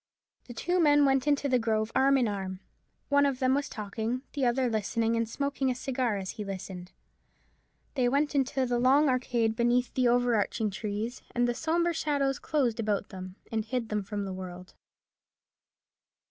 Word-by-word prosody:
The 240 - -10
two 355 +9 0
men 290 -3 +5
went 270 0 +2
into 285 -1 +2
the 255 -2 +3
grove 220 -1 0
arm 270 +1 +4
in 250 -3 +2
arm. 190 -2 -4 0.5
One 285 0 +4
of 275 -2 +1
them 255 0 +2
was 285 +1 0
talking, 220 +4 -4
the 275 -4 +1
other 250 +1 +1
listening, 225 +1 0
and 230 -1 -1
smoking 280 +1 -1
a 250 - 0
cigar 250 -4 -1
as 190 -1 -4
he 210 - -6
listened. 190 -2 -7 1.0
They 250 -3 +2
went 285 +4 +1
into 265 -1 +1
the 245 -1 0
long 275 +4 +4
arcade 240 -3 +1
beneath 240 +1 +1
the 255 -1 +2
over 245 0 +3
arching 215 0 0
trees, 215 +4 -4
and 245 0 +2
the 240 - +1
sombre 340 +5 0
shadows 280 -4 0
closed 255 -7 0
about 210 -2 -1
them 185 -1 -8 0.2
and 220 -1 0
hid 230 +1 -3
them 210 -1 0
from 205 0 -4
the 190 - -4
world. 180 0 -8
245 Hz, 180 wpm, -29 LUFS, 215-270 Hz, 1.0 s, men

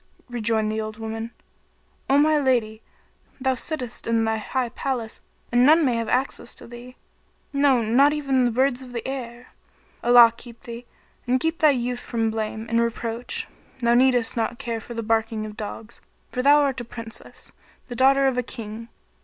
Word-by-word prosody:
Rejoined 220 -2 0
the 220 0 -2
old 215 0 -6
woman, 225 0 -5 0.8
"o 275 - +5
my 305 +1 +4
lady, 235 -5 0 0.6
thou 265 0 +1
sittest 255 -2 -4
in 230 -1 +2
thy 220 0 0
high 245 +3 -2
palace 240 -3 -3 0.3
and 240 +1 +4
none 310 +4 +6
may 250 - +2
have 230 -1 -2
access 250 -1 -1
to - - -9
thee; 240 +2 -11 0.6
no, 280 -4 +3
not 260 +7 +4
even 275 -4 +1
the - - +3
birds 255 +2 +1
of 250 -1 -10
the 235 - -4
air. 245 -2 -7 0.5
Allah 240 -1 +8
keep 235 -1 -13
thee, 235 +1 -9 0.4
and 255 +1 +2
keep 325 +4 -1
thy 310 - +6
youth 250 -2 0
from 225 -2 -1
blame 220 0 -3
and 230 +1 +2
reproach! 230 0 -3 0.3
Thou 235 -2 +2
needest 245 -2 +3
not 235 +1 -1
care 230 -2 -4
for 235 +2 -9
the 230 - -3
barking 220 0 0
of 210 -1 -8
dogs, 220 +2 -8 0.3
for 250 - -1
thou 290 +3 +6
art 270 -3 -1
a - - -5
Princess, 230 -1 -9 0.3
the 245 - -8
daughter 270 +2 +4
of 260 -2 +2
a - - +2
King. 230 -2 -7
240 Hz, 180 wpm, -24 LUFS, 225-260 Hz, 0.8 s, Allah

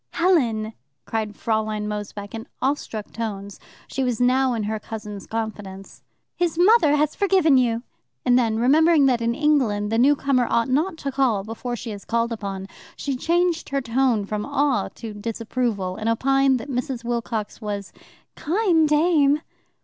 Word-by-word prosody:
"Helen!" 240 -12 +1 0.3
cried 215 -2 -3
Fraulein 215 -1 -1
Mosebach 205 -1 -6
in 225 0 -7
awestruck 255 -5 -2
tones 200 -3 -5 0.3
(she 270 - -2
was 245 -3 -1
now 255 +1 +3
in 220 - -2
her 215 +1 -2
cousin's 210 -2 -8
confidence) 205 -4 -6 0.3
"his 345 -2 -1
mother 355 -5 +5
has 300 0 +1
forgiven 375 -7 +3
you!" 235 -2 +2 0.4
And 245 - +4
then, 230 -3 +2
remembering 300 +5 +4
that 250 -3 +2
in 235 +1 0
England 255 -9 +1
the 225 - +2
new 280 +4 +5
comer 270 -4 +1
ought 235 +1 +1
not 320 +7 0
to 280 -3 -4
call 255 -7 +1
before 230 +3 -5
she 235 -1 -6
is 200 -2 -8
called 235 +1 0
upon, 195 -4 -5 0.3
she 280 -2 -3
changed 340 +4 0
her 275 -1 0
tone 245 -3 +1
from 210 +1 -3
awe 285 0 0
to 225 -3 -7
disapproval, 220 -3 -3
and 220 +1 -1
opined 270 +3 +3
that 260 - -8
Mrs. 255 -2 -3
Wilcox 235 -2 -3
was 205 -2 -5 0.4
"keine 340 -2 +2
Dame." 300 -1 +3
240 Hz, 160 wpm, -23 LUFS, 215-285 Hz, 0.4 s, mother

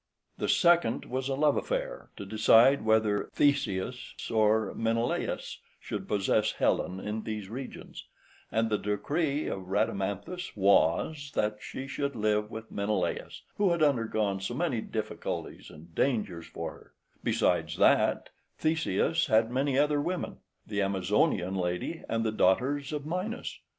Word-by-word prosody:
The - - -1
second 170 -9 +3
was 130 +1 -3
a 135 - 0
love 145 +1 +3
affair, - - -3
to 100 - -6
decide 115 +6 +5
whether 110 -2 +2
Theseus 125 -5 0 0.2
or 110 -1 +3
Menelaus 115 +1 -1 0.2
should - - -5
possess 105 +1 +1
Helen 95 +1 0
in 105 +2 -3
these 105 -3 -5
regions; 130 +3 -8 0.5
and 115 0 +1
the 105 - +2
decree 145 - -1
of 95 -2 -4
Rhadamanthus 100 - -2
was, 100 - +2
that 105 0 0
she 130 - -6
should 140 0 -3
live 105 -1 +1
with 110 0 -8
Menelaus, 100 +1 -2
who 205 -2 +3
had 170 -2 +2
undergone 110 -8 +1
so 95 +5 -4
many 140 -7 0
difficulties 110 -1 -5
and 80 +2 -14
dangers 100 -11 -1
for - - -5
her; - - -17 0.3
besides, - - +1
that - - +3 0.3
Theseus 160 +1 +1
had 115 +2 +3
other 145 +2 +2
women, 180 +4 -3 0.3
the 105 -1 -2
Amazonian 95 -1 +1
lady 90 - -2
and 115 0 0
the 110 - 0
daughters 130 +8 +2
of 150 -1 -4
Minos. 185 +8 -4
115 Hz, 135 wpm, -29 LUFS, 105-145 Hz, 0.5 s, decide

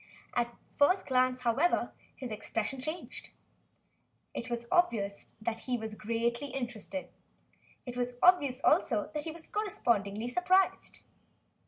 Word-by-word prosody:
At 240 -1 +2
the 235 - -22 0.2
first 365 +7 +4
glance, 255 -1 +2
however, 255 +9 +2 0.2
his 255 -4 -6
expression 225 +4 -3
changed. 310 +6 -5 1.0
It 235 - -5
was 235 0 -3
obvious 220 - +2
that 225 +1 -2
he 250 0 -1
was 220 -1 -5
greatly 235 +5 -1
interested. 255 +1 -4 0.8
It 245 -2 -6
was 245 0 -2
obvious, 285 -8 +5
also, 265 - +3
that 300 -1 -3
he 320 - -3
was 320 0 -9
correspondingly 235 - 0
surprised. 365 +7 +2
250 Hz, 130 wpm, -31 LUFS, 230-300 Hz, 1.0 s, obvious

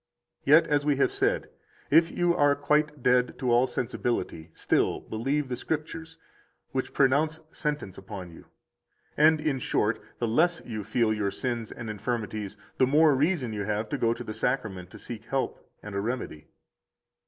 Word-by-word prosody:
78 145 - +8
Yet, 160 - -2
as 145 - +1
we 145 -1 +2
have 135 - +2
said, - - 0 0.4
if 165 +3 +6
you 175 0 +1
are 145 0 +4
quite 150 -1 +1
dead 125 0 +3
to 125 -2 0
all 120 +2 +4
sensibility, 120 -9 -3
still - - +1
believe 135 +6 -1
the 125 - -2
Scriptures, 160 +4 -4 0.5
which 130 -1 -2
pronounce 150 +4 +2
sentence 145 - -3
upon 95 -2 -8
you. 80 - -14 0.7
And, 155 +1 +5
in 150 -3 0
short, 110 -2 0 0.2
the 120 - -1
less 165 +9 +3
you 110 -3 -5
feel 110 +1 +1
your 105 -2 0
sins 120 +1 -3
and 120 - -7
infirmities, 110 -1 -3 0.2
the 130 - +5
more 150 +2 +5
reason 140 -4 +1
have 105 +1 -1
you - - -21
to - - 0
go 115 - +3
to - - -7
the 110 - -6
Sacrament 105 -8 -2
to - - -11
seek 115 -2 -8
help 135 -1 -3
and 105 - -7
a 100 - -1
remedy. 115 -9 -4
125 Hz, 175 wpm, -27 LUFS, 110-150 Hz, 0.7 s, 78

